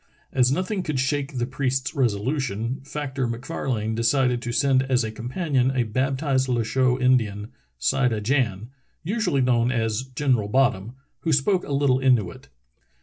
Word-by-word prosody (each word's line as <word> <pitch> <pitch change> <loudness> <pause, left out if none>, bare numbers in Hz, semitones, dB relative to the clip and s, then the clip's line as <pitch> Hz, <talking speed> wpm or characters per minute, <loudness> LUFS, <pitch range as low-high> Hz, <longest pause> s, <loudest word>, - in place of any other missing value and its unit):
As 125 -1 +3
nothing 185 +6 -1
could 155 -6 -2
shake 140 +1 -1
the 120 - 0
priest's 130 0 -2
resolution. 125 -1 -1
Fac 145 -1 -5
tor 130 -2 -1
MacFarlane 115 -2 -3
decided 120 +2 +1
to 120 - -4
send 135 +1 +3
as 130 -2 +1
a 110 - -3
companion 130 +3 -1
a 130 -2 +1
baptized 130 +3 0
Loucheux 125 +2 +1
Indian, 110 -5 +1 0.3
Sida 125 - +1
Jan, 115 -2 -1 0.3
usually 180 - 0
known 125 -1 +2
as 115 -2 0
General 130 -4 0
Bottom, 120 -3 +1 0.3
who 165 - -1
spoke 180 +7 +2
a - - -7
little 140 -2 +2
Inuit. 120 - +1
130 Hz, 145 wpm, -24 LUFS, 115-135 Hz, 0.3 s, As